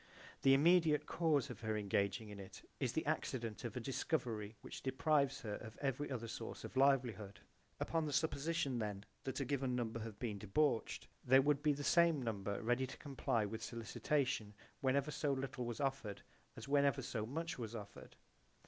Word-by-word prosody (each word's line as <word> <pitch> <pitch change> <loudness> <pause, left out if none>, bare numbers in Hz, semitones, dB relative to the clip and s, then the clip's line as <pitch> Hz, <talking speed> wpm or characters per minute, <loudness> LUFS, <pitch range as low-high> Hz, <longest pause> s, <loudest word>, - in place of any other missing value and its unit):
The 135 0 +7
immediate 160 0 +5
cause 150 -5 +1
of 115 - -8
her 110 -1 -1
engaging 100 +1 0
in 105 -1 -8
it 95 - -10 0.2
is - - 0
the - - -1
accident 115 -3 -2
of 120 +1 -4
a - - 0
discovery 115 -5 -2
which - - -8
deprives 140 +1 +2
her 105 -2 -3
of 110 -1 -10
every 140 +1 -1
other 120 -4 -3
source 115 0 -6
of - - -7
livelihood. 125 -7 +2 0.4
Upon 160 -2 0
the - - -2
supposition 145 -2 0
then 105 -2 -3 0.2
that 135 0 -2
a 135 - 0
given 130 -1 0
number 115 -2 -2
have 110 -2 -6
been 105 -4 -3
debauched 115 +5 +1 0.2
there 130 +2 +6
would 145 0 +3
be 150 0 +3
the 145 +1 -4
same 170 -1 +5
number 100 -3 -2
ready 120 +3 +2
to - - -9
comply 130 -6 0
with 110 +2 -5
sollicitation 115 -1 -1 0.3
whenever 140 +2 +2
so 145 0 0
little 130 -2 -3
was 120 -2 -4
offered 135 -7 -2 0.3
as - - -7
whenever 140 -1 +3
so 110 -3 -3
much 160 +2 -3
was 115 -1 -4
offered. 105 -2 -9
130 Hz, 180 wpm, -38 LUFS, 110-140 Hz, 0.4 s, The